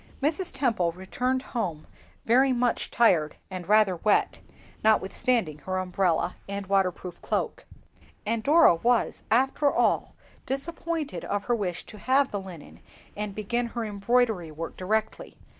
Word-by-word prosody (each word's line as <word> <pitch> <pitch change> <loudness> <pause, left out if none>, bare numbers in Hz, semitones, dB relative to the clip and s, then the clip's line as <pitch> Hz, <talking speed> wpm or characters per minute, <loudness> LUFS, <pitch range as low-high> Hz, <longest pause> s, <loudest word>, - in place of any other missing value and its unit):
Mrs. 320 +6 0
Temple 230 -11 0
returned 250 +8 -2
home 175 -11 -2 0.4
very 260 +4 +4
much 245 -1 0
tired 170 -10 +3 0.2
and 185 -1 -7
rather 210 -4 +4
wet, 210 +4 +1 0.4
notwithstanding 215 -5 +1
her 185 +5 -3
umbrella 180 -2 0
and 200 0 -4
waterproof 185 -2 -1
cloak. - - -2 0.6
And 225 +1 0
Dora 300 - +6
was, 235 +8 +1
after 270 +4 +3
all, - - +1 0.3
disappointed 320 +2 -3
of 205 0 -2
her 240 - +1
wish 185 -6 -3
to 215 - -12
have 265 +3 +2
the 200 - -3
linen 180 -5 -11 0.4
and 210 -1 -4
begin 235 +3 -1
her 235 -1 -4
embroidery 210 -3 +1
work 165 +2 -6
directly. 215 +4 -2
Mrs. - - -24
215 Hz, 140 wpm, -27 LUFS, 185-250 Hz, 0.6 s, Dora